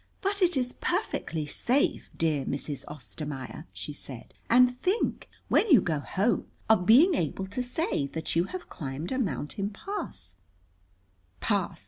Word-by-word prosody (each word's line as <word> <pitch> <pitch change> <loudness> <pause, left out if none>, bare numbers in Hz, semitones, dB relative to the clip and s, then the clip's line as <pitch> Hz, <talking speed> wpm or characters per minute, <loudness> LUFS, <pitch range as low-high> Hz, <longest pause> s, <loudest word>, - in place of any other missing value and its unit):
"But 400 0 0
it 360 -5 +4
is 250 -1 0
perfectly 155 -2 -1
safe, 250 - 0
dear 155 -4 +1
Mrs. 140 +1 -4
Ostermaier," 150 -1 -7
she 150 - -6
said 130 -4 -10 0.2
"And 250 +1 +6
think, 375 - 0 0.2
when 445 - +3
you 275 - +9
go 160 -5 0
home, 200 +10 0 0.2
of 200 -5 +4
being 300 - +8
able 190 - -1
to 200 +6 -3
say 245 - -1
that 160 +3 -4
you 170 +1 +3
have 370 - -7
climbed 145 +2 -5
a 260 - 0
mountain 195 - -2
pass." 215 - -6 1.0
"Pass!" - - 0
190 Hz, 145 wpm, -28 LUFS, -, 1.0 s, you